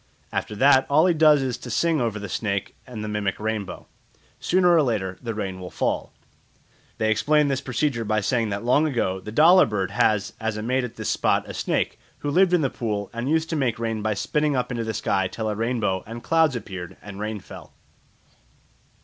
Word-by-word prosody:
After 105 - -3
that 130 +3 +5
all 150 +4 +5
he 180 - +4
does 150 -3 +5
is 125 -2 -3
to - - -9
sing 165 -4 +1
over 115 -3 -1
the 105 -1 -6
snake 100 0 -3
and 115 -4 -6
the - - -4
mimic 105 -3 -2
rainbow; 105 -3 -4 0.5
sooner 180 -1 +3
or 165 - +5
later 100 -8 -1
the 115 -3 -4
rain 95 -3 -4
will 90 -1 -7
fall. - - -2 0.9
They 110 0 +1
explain 150 +6 +3
this 135 -1 -1
procedure 125 -1 -1
by 110 0 0
saying 115 +1 0
that 100 +2 -3
long 145 +6 +3
ago 105 -9 -1
the 105 - -8
dollar 170 +9 +6
bird 100 -4 -2
had 105 -2 +2 0.2
as 110 -2 -2
a 105 - -4
mate 130 +3 0
at 125 - -6
this - - -4
spot - - +1
a - - -7
snake, - - -1 0.2
who 145 - -2
lived 185 +3 +4
in 175 - +4
the 135 - 0
pool 105 -4 -3
and 120 +3 -3
used 160 +1 +1
to - - 0
make 125 -6 0
rain 115 -1 -2
by 110 0 -1
spitting 150 +6 0
up 125 -1 -1
into 120 -2 -2
the 110 -1 -3
sky 95 -1 0
till 110 +4 -4
a 105 - 0
rainbow 110 -4 -1
and 115 +1 -8
clouds 160 -4 +3
appeared 95 -6 -7
and 100 -1 -9
rain 105 0 -3
fell. - - -12
115 Hz, 215 wpm, -24 LUFS, 105-145 Hz, 0.9 s, dollar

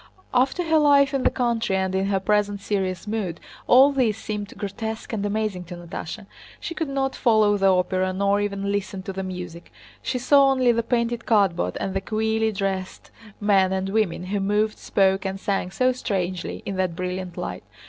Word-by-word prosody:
After 265 +8 +2
her 320 -1 +3
life 280 -2 +5
in 270 - +1
the - - +4
country, 235 -5 0
and 190 0 0
in 190 +1 0
her 195 -1 +1
present 205 +1 +1
serious 190 -2 -2
mood, 205 -6 -3 0.3
all 265 +3 +7
this 245 -6 +1
seemed 210 -2 -5
grotesque 220 +3 -5
and 205 -2 -2
amazing 205 -3 -2
to 175 - -8
Natásha. 175 +4 -7 0.3
She 335 - -5
could 320 -2 -3
not 270 -1 -1
follow 215 -4 +3
the 195 -1 +2
opera 185 0 +1
nor 200 +2 +1
even 200 -1 -2
listen 200 -1 -3
to 195 - -5
the 190 - -4
music; 180 -2 -7 0.3
she 260 - -2
saw 275 +2 +5
only 260 -2 +3
the 230 0 +1
painted 235 0 -1
cardboard 190 - +2
and 190 - -3
the 195 - -1
queerly 220 +2 0
dressed 195 -2 -4 0.3
men 195 -2 +3
and 190 0 -1
women 195 -5 0
who 200 +2 -2
moved, 210 +2 0
spoke, 190 -1 +2
and 195 0 -3
sang 195 -2 -1
so 255 +7 +2
strangely 185 -8 -3
in 195 - -4
that 185 -3 0
brilliant 180 0 -4
light. 90 0 -5
205 Hz, 190 wpm, -24 LUFS, 190-230 Hz, 0.3 s, all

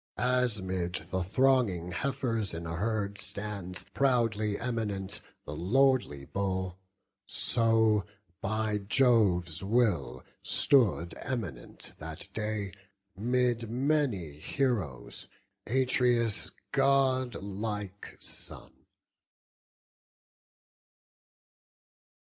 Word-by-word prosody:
As 125 -4 +2
'mid 90 -2 -2 0.2
the 95 - 0
thronging 100 -4 +2
heifers 115 -2 -1
in 85 +1 -5
a 85 +1 -3
herd 100 +1 -1
Stands, 100 -3 -4
proudly 115 -6 +2
eminent, 105 -5 -3 0.2
the 75 - -6
lordly 115 - +2
bull; 95 -1 -2 0.5
So, 110 -3 +3 0.3
by 110 0 0
Jove's 100 - +3
will, 95 - +1 0.2
stood 100 - +4
eminent 105 - -5
that 80 0 -8
day, 105 -3 -2 0.4
'Mid 120 +1 +1
many 120 - 0
heroes, 95 - -2 0.4
Atreus' 125 -3 +2 0.2
godlike 115 -8 0
son. - - -8
105 Hz, 75 wpm, -30 LUFS, 95-125 Hz, 0.5 s, stood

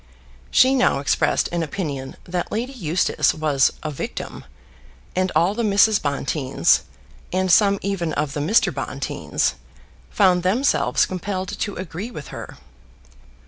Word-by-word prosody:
She 260 +1 +5
now 255 - +3
expressed 140 0 +1
an 170 0 -1
opinion 145 -5 -4
that 175 0 -4
Lady 240 +5 -3
Eustace 175 - +1
was 150 -3 +2
a 155 - -3
victim, 140 - -6 0.7
and 185 0 +1
all 175 +4 +3
the 235 - -2
Mrs. 210 0 +4
Bonteens, 140 - +1 0.5
with 185 0 +1
some 200 +2 +5
even 190 -5 -1
of 145 -1 -2
the 145 - -3
Mr. 175 +11 +2
Bonteens, - - -2 0.6
found 185 -3 +3
themselves 225 +10 +2
compelled 185 0 -4
to 205 - -2
agree 185 +4 -6
with 150 -12 -9
her. - - -8
180 Hz, 135 wpm, -22 LUFS, 150-200 Hz, 0.7 s, She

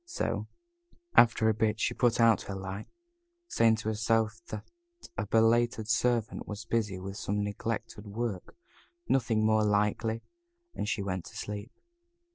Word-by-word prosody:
So, 360 - -2 0.7
after 115 -1 +6
a 110 - +4
bit, 110 0 0
she - - +1
put 120 -2 +2
out 115 -3 +5
her 100 - -3
light, 95 +2 -6 0.6
saying 115 - +4
to 110 0 -3
herself 110 0 +1
that 110 -1 -6 0.5
a 100 +1 -3
belated 115 0 +3
servant 115 0 +1
was 105 +1 -6
busy 110 -5 0
with 95 +2 -6
some 105 +1 -1
neglected 110 +1 -4
work 105 -2 -4 0.5
nothing 115 -4 +2
more 110 0 +4
likely 105 +2 +1 0.5
and 105 - -3
she 115 -4 -1
went 95 -2 -3
to - - -12
sleep. 105 +3 -5
110 Hz, 145 wpm, -30 LUFS, 105-115 Hz, 0.7 s, after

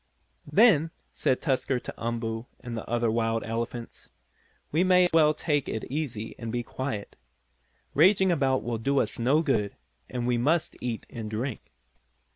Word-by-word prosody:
"Then," 190 -9 +5 0.2
said 130 - 0
Tusker 135 -3 +1
to - - -8
Umboo, 115 0 -3
and 120 -1 -6
the 115 - -6
other 120 -1 +1
wild 115 0 0
elephants, 115 +1 -5 0.6
"we 160 +4 +3
may 180 -1 +5
as 175 - +1
well 155 -2 +5
take 145 -3 0
it 110 - -3
easy 130 -7 -3
and 115 -1 -4
be 120 0 -1
quiet. 120 -5 -5 0.8
Raging 190 +4 +5
about 135 -5 +1
will 115 -2 -2
do 140 +4 +1
us - - -1
no 140 +7 +3
good, 110 -9 0 0.3
and 125 -2 -3
we 120 -1 +1
must 160 +6 +1
eat 120 -3 -3
and 110 -2 -5
drink." 115 - -4
125 Hz, 160 wpm, -27 LUFS, 115-150 Hz, 0.8 s, Then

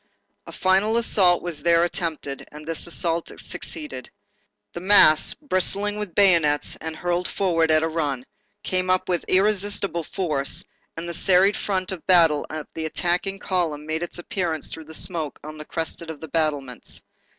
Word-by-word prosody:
A - - -8
final 195 +4 +2
assault 190 -6 +3
was 170 -4 -4
there 170 0 +4
attempted, 160 -6 -3
and 150 +1 -10
this 165 +1 -4
assault 170 0 -1
succeeded. 300 -1 -7 0.6
The - - -5
mass 180 -5 +5
bristling 205 - -1
with 205 -5 -5
bayonets 170 -7 +3
and 160 0 -5
hurled 175 +2 -1
forward 165 -4 +1
at 155 0 +4
a - - +2
run, 145 -6 -2 0.4
came 185 0 -1
up 185 0 +2
with 175 -2 0
irresistible 195 -3 +1
force, 155 -7 -2 0.3
and 165 +1 -5
the 170 - -4
serried 190 +3 +4
front 190 -2 -2
of 185 -4 -7
battle 165 -5 +5
of 155 -1 -5
the 160 - -4
attacking 180 +4 -1
column 170 -6 -2
made 160 +1 -2
its 175 - -4
appearance 175 -3 -2
through 160 - -8
the 160 +1 -8
smoke 160 -5 -1
on 155 +1 -8
the 150 - -7
crest 165 +1 -3
of 160 -3 -7
the 160 - -9
battlements. 145 -6 -2
170 Hz, 165 wpm, -24 LUFS, 155-185 Hz, 0.6 s, mass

